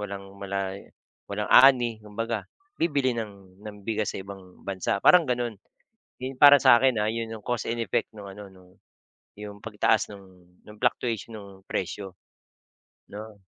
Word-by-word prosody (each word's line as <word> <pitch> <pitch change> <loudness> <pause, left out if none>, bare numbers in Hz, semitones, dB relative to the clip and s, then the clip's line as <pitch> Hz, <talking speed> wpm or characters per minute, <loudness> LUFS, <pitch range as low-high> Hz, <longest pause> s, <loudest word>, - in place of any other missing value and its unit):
walang 100 -1 -7
wala'y 100 0 -4 0.4
walang 105 +1 -3
ani, 120 -4 +6
kumbaga. 105 -1 -4 0.3
Bibili 145 -6 +1
ng 100 -3 -8
ng 105 -1 -9
bigas 110 -2 -1
sa - - -4
ibang 95 -2 -13
bansa, 100 0 -2
parang 180 -2 +7
gano'n. 120 -2 -1 0.7
Yun 130 0 -5
para 145 +1 +9
sa 120 - +7
akin, 130 -4 +2
ah, 105 - +1
'yun 115 0 -3
'yong 110 - -8
cause 120 -1 -2
and 115 0 -2
effect 100 - -1
no'ng 100 -2 -10
ano, 100 +1 -10
no'ng 90 -1 -19 0.7
'yong 105 -1 -8
pagtaas 110 0 +1
ng 100 -1 -12 0.5
ng 105 - -13
fluctuation 115 -2 -1
ng 100 -1 -10 0.2
presyo, 95 +1 -4 1.0
'no? 105 0 -9
105 Hz, 155 wpm, -26 LUFS, 100-115 Hz, 1.0 s, para